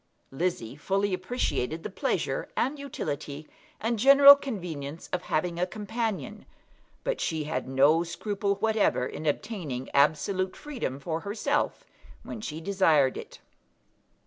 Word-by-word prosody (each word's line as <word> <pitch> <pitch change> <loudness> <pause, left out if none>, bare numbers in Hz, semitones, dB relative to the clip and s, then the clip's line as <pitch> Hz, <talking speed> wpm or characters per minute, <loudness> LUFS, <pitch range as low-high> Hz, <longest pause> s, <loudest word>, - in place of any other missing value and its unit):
Lizzie 135 -5 -2
fully 195 +6 0
appreciated 185 - -2
the - - -4
pleasure, - - -1
and 285 +2 0
utility, 150 - -5 0.3
and 225 0 -1
general 275 +3 +10
convenience 170 - -6
of 180 - 0
having 170 +1 -1
a 180 - +1
companion, 210 - -4 0.6
but - - -2
she 160 -2 -1
had 145 -4 -3
no 140 +5 +4
scruple 200 +3 -2
whatever 215 - +1
in 155 +4 -5
obtaining 150 - -3
absolute 185 +7 +2
freedom 245 - -5
for 160 +3 -3
herself 220 - -1 0.4
when 220 - -7
she 160 -6 -5
desired 165 -7 +3
it. - - -9
180 Hz, 125 wpm, -28 LUFS, 150-215 Hz, 0.6 s, general